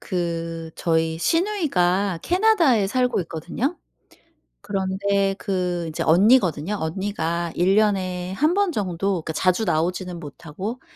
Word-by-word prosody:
그 165 -2 -3
저희 160 -1 0
시누이가 200 - +1
캐나다에 350 - +3
살고 250 0 +1
있거든요. 175 - -4 0.8
그런데 195 0 0
그 180 -3 -2
이제 155 - -3
언니거든요. 190 - +3
언니가 170 -1 -2
1 180 +3 +3
년에 185 -4 0
1 305 - +2
번 400 -1 +2
정도 190 - -1
그러니까 160 - -4
자주 185 +6 +1
나오지는 180 +1 -1
못하고 175 - -7
185 Hz, 270 characters per minute, -23 LUFS, 170-215 Hz, 0.8 s, 캐나다에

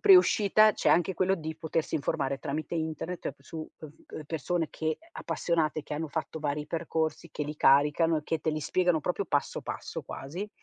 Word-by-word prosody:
pre-uscita, 215 - +6
c'è - - +1
anche 175 +2 +4
quello 190 +2 +2
di 160 -2 -5
potersi 160 -1 -2
informare 140 -2 -1
tramite 155 +4 -3
internet 160 +2 -3
ep - - -5
su, 165 - -10
uhm, 155 - -6 0.4
v - - -13
uhm, 155 - -5
persone 165 +2 -1
che 160 - -5
ehm, 330 - -21
appassionate, 155 -3 -1
che 150 - -5
hanno 160 +2 -2
fatto 160 +1 -4
vari 150 -1 -2
percorsi, 160 0 -2
che 150 - -3
li 150 +1 -5
caricano 150 +4 +4
e - - -7
che 160 +2 -1
te 160 - 0
li 155 0 -2
spiegano 175 +1 +2
proprio 180 +5 -1
passo 145 -3 0
passo - - -5
quasi 175 +10 -6
160 Hz, 200 wpm, -29 LUFS, 150-175 Hz, 0.4 s, pre-uscita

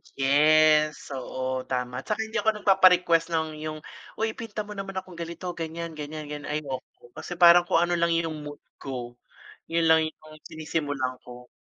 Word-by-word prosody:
yes 150 +2 +4
oo 130 -1 -4
tama. 125 -1 -3
Tsaka 215 +7 -2
hindi 220 +1 -3
ako 220 - +2
nagpapa-request 180 -4 +5
ng 160 0 0 0.2
yung, 155 0 -5 0.4
"Oy 220 0 -1
ipinta 220 -1 -6
mo 210 - -11
naman 195 -1 -6
akong 185 -2 -7
ganito 170 +2 -5
ganiyan 165 0 -5
ganiyan 155 0 -7
ganiyan." 145 -1 -6
Ayoko 135 -5 -6
kasi 175 - -7
parang 175 0 +7
kung 165 - +3
ano 175 0 0
lang 170 0 +2
yung 165 -2 -2
mood 145 0 -9 0.2
ko, 120 -2 -7 0.5
yun 165 0 0
lang 160 0 +4
yung 155 - -10 0.3
sinisimulan 145 -5 -3
ko. 125 0 -11
160 Hz, 165 wpm, -26 LUFS, 145-175 Hz, 0.5 s, parang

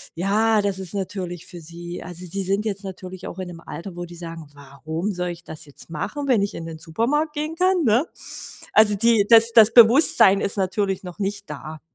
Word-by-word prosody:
Ja, 210 +4 +2
das 195 -1 -1
ist 190 +1 -6
natürlich 185 -3 -5
für 175 -2 -10
sie 170 +2 -8
also, 180 +1 -8
sie 195 +3 -4
sind 195 +3 -1
jetzt 200 -2 -3
natürlich 185 -1 -9
auch 175 - -8
in 185 - -5
'nem 170 - -9
Alter, 175 +1 -8
wo 175 - -5
die 175 0 -12
sagen: 165 -2 -8
„Warum 155 +7 -5
soll 180 -2 -3
ich 175 0 -8
das 160 -1 -9
jetzt 145 +3 -12
machen, 280 - -4
wenn 235 -6 +3
ich 200 - -2
in 165 - -7
den 160 -1 -7
Supermarkt 255 - -1
gehen 305 +2 -4
kann“, 365 0 +2
ne? 240 +4 +3 0.7
Also, 210 -1 +5
die 225 -1 +3
das 230 0 +7
das 225 -1 +7
Bewusstsein 230 -4 +7
ist 200 - -1
natürlich 195 0 -1
noch 180 +2 -10
nicht 200 -1 -4
da. 155 +2 -8
190 Hz, 210 wpm, -22 LUFS, 170-220 Hz, 0.7 s, das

